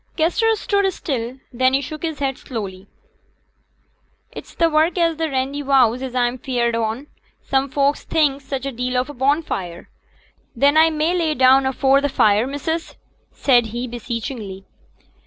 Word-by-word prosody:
Kester 440 +8 +2
stood 400 -2 0
still; 250 -5 -4 0.2
then 255 +2 +2
he 275 - +1
shook 305 +3 -7
his 320 -3 -3
head 270 -2 -1
slowly. 200 -7 -7 1.4
'It's - - -11
t' 335 - +2
work 320 +2 +2
at 330 -2 +1
t' 325 - +1
Randyvowse 265 -3 +1
as 260 -1 -5
a'm 245 0 0
afeared 240 -2 -1
on. 230 +4 -2 0.4
Some 270 0 0
folks 280 +2 +1
thinks 285 -4 0
such 270 -1 -4
a 275 - -2
deal 250 +1 -2
o' - - +4
a 290 - -8
bonfire. 260 - -2 0.7
Then 280 +5 +3
a 320 +1 +6
may 315 +2 0
lay 340 -2 +1
me - - -9
down 265 +1 +5
afore 270 +1 +3
t' 285 - +1
fire, 215 -3 +3
missus?' 320 +4 -4 0.4
said 245 -4 +3
he, 240 +3 -4
beseechingly. 230 -4 -6
270 Hz, 160 wpm, -20 LUFS, 240-305 Hz, 1.4 s, a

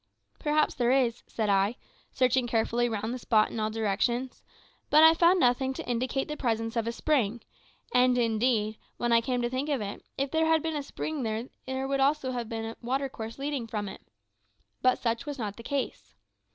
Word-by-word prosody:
"Perhaps 300 0 +2
there 240 -2 +1
is," 250 -3 +2
said 220 -2 -2
I, 200 +3 +2 0.4
searching 255 -1 +2
carefully 235 +1 +1
round 220 +1 -2
the 255 - -4
spot 215 -3 +2
in 230 - -4
all 215 0 0
directions; 225 +4 -1 0.5
but 305 +1 +7
I 320 0 +9
found 345 +3 +4
nothing 260 0 +2
to - - -6
indicate 255 +3 -1
the 300 - -4
presence 225 -4 -1
of 230 -1 0
a - - 0
spring 235 -3 0 0.5
and, 250 0 +4
indeed, 220 -2 +1 0.2
when 240 0 0
I 230 0 +5
came 245 +1 -1
to 240 - 0
think 265 +4 -2
of 280 -3 +1
it, 205 -1 -6
if 275 0 -1
there 320 0 +2
had 320 -1 +3
been 320 -1 -2
a 295 - -1
spring 300 +1 -4
there 255 +4 -4
would 275 0 0
also 275 0 +2
certainly 250 - -4
have 230 -2 -5
been 225 -1 -3
a 225 - -6
water 265 +3 -1
course 225 -2 -7
leading 275 -4 -3
from 210 -2 -3
it. 190 - -8 0.8
But 255 0 +4
such 235 +4 -2
was 290 -1 -4
not 210 -5 -4
the - - -10
case. 270 +3 -4
245 Hz, 205 wpm, -28 LUFS, 225-275 Hz, 0.8 s, I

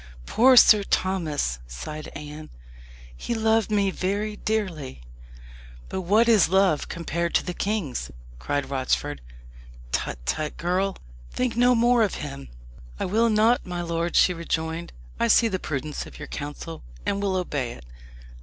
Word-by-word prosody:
"Poor 255 - +5
Sir 215 -2 +8
Thomas!" 160 - -1
sighed 150 - -7
Anne. 150 +1 -8 0.7
"He 235 - -3
loved 225 -1 +2
me 200 -2 +2
very 205 +3 -2
dearly." 180 - -3 0.9
"But 190 - -3
what 210 +6 +3
is 220 -6 +6
his - - -5
love 190 -5 +3
compared 170 0 -2
to - - +2
the 180 - -3
king's?" 195 - -2 0.3
cried 140 - -2
Rochford. 130 - -1 0.7
"Tut, 60 - -2
tut, 150 - -2
girl! 185 +3 0 0.3
think 250 -3 -1
no 245 +1 +4
more 240 +1 +4
of 210 -4 +1
him." 140 -2 -7 0.5
"I - - -1
will 225 +5 +2
not, 220 +3 +3
my 175 -1 -4
lord," 170 0 -2
she 180 - +5
rejoined; 165 0 -3 0.3
"I - - +2
see 230 - +5
the 190 -4 -2
prudence 150 -1 -4
of - - -12
your - - -8
counsel, 145 +3 -6 0.2
and 200 - -1
will 195 -2 0
obey 145 -9 -2
it. 65 - -14
180 Hz, 155 wpm, -25 LUFS, 150-215 Hz, 0.9 s, Sir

